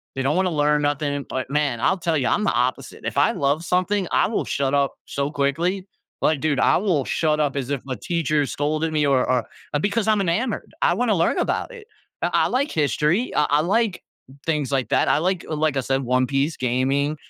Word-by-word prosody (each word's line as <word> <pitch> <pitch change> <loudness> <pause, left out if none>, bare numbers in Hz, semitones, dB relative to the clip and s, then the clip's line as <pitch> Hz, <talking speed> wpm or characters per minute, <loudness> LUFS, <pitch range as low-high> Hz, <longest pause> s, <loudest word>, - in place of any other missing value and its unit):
They 135 - -2
don't 140 +4 +1
want 190 0 +2
to - - -1
learn 150 0 +2
nothing. 145 -1 -1
But 130 0 -4
man, 145 -5 0
I'll 190 +6 +2
tell 165 -1 0
ya, 130 - +1
I'm 210 - 0
the 205 - +2
opposite. 125 +2 -2
If - - -3
I - - +4
love 140 +4 0
something, 185 +2 0
I - - +3
will 225 - -1
shut 140 0 -1
up 140 -1 +2
so 140 0 -2
quickly. 170 +7 -1 0.4
Like, 155 -2 +2
dude, 145 -3 +1
I - - +4
will 175 -8 0
shut 155 -2 0
up 145 -2 0
as 135 -2 -3
if 140 -3 -2
a 130 - -3
teacher 155 -2 0
scolded 155 +2 -1
me 150 -1 +1
or 135 -3 +2
or 125 -3 +1 0.4
because 210 +3 0
I'm 215 -1 +3
enamored. 205 +6 -2
I - - +3
want 245 -1 0
to - - +3
learn 170 -1 +1
about - - -1
it. 450 -3 -11 0.4
I - - +2
I - - +3
like 275 +4 0
history, 155 - 0
I 150 - +4
I 145 +1 +4
like 205 +3 0 0.5
things 150 -5 0
like 135 -2 0
that. - - +2
I - - +3
like 185 +1 -1
like 155 -2 0
I - - +1
said, 135 +1 0
One 130 +1 +2
Piece, 140 +4 0
gaming, 135 +4 0
150 Hz, 225 wpm, -22 LUFS, 140-175 Hz, 0.5 s, I